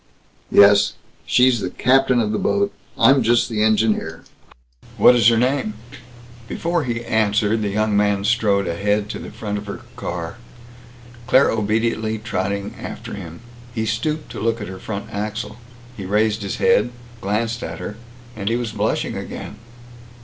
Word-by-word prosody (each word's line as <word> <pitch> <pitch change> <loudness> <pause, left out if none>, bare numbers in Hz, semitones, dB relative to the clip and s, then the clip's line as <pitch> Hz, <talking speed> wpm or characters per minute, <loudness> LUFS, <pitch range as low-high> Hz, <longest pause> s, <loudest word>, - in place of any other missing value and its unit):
"Yes. 100 0 +6 0.3
She's 125 -1 +4
the 95 - -3
captain 130 +5 +3
of 105 -2 0
the 105 - -1
boat. 200 0 +1 0.2
I'm 135 0 +5
just 120 +1 +3
the 110 -2 -1
engineer." 110 0 +1 0.7
"What 125 - +7
is 115 -3 +4
her 115 -1 +5
name?" 125 -2 0 0.7
Before 170 +1 -1
he 120 -1 -3
answered 110 -1 +1
the 105 - -1
young 105 +1 0
man 100 -1 +2
strode 105 -3 +2
ahead 105 +4 0
to - - -6
the - - -8
front 105 -1 -4
of 100 - -10
her 100 - -6
car, 85 +2 -5 0.9
Claire 130 +1 +5
obediently 110 0 0
trotting 100 -2 -3
after - - -7
him. 85 -2 -8 0.3
He 110 -1 -1
stooped 150 +8 -2
to - - -6
look 115 +1 0
at 105 - -5
her 95 0 -8
front 110 +1 -6
axle. 110 +1 -4 0.4
He 100 - -7
raised 105 +2 +1
his 100 -1 -3
head, 105 +4 +3 0.3
glanced 115 +4 -1
at - - -5
her, 105 - -6 0.4
and 100 -1 -2
he 115 - +1
was 120 -2 -2
blushing 105 0 -1
again. 105 - -7
110 Hz, 160 wpm, -21 LUFS, 105-115 Hz, 0.9 s, What